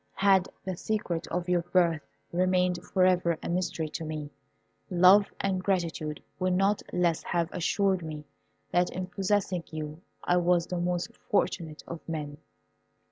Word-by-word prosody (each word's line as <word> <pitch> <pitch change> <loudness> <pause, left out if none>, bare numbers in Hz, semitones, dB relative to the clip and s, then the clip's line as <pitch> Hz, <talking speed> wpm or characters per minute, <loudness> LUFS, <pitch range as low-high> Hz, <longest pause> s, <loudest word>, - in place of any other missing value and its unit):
Had 195 -2 +4 0.2
the 190 -1 -2
secret 175 -4 -2
of 175 0 -2
your 180 -1 +2
birth 170 -3 +2 0.3
remained 180 0 +2
for 185 -2 +2
ever 175 -3 +3
a - - -3
mystery 170 -2 -1
to 165 - -5
me, 155 -2 -5 0.6
love 185 +3 +6
and 190 -2 0
gratitude 165 -6 -1 0.2
would 185 0 +1
not 195 +3 +2
less 175 -2 +1
have 170 -1 -1
assured 190 +2 +1
me 155 -2 -6 0.5
that 175 0 +3
in 185 0 -4
possessing 190 -1 0
you 155 0 -6 0.2
I 175 - +3
was 175 -1 +3
the 180 - -3
most 175 0 -1
fortunate 165 -6 -1
of 170 - -6
men! 150 -3 -4
180 Hz, 150 wpm, -29 LUFS, 165-185 Hz, 0.6 s, love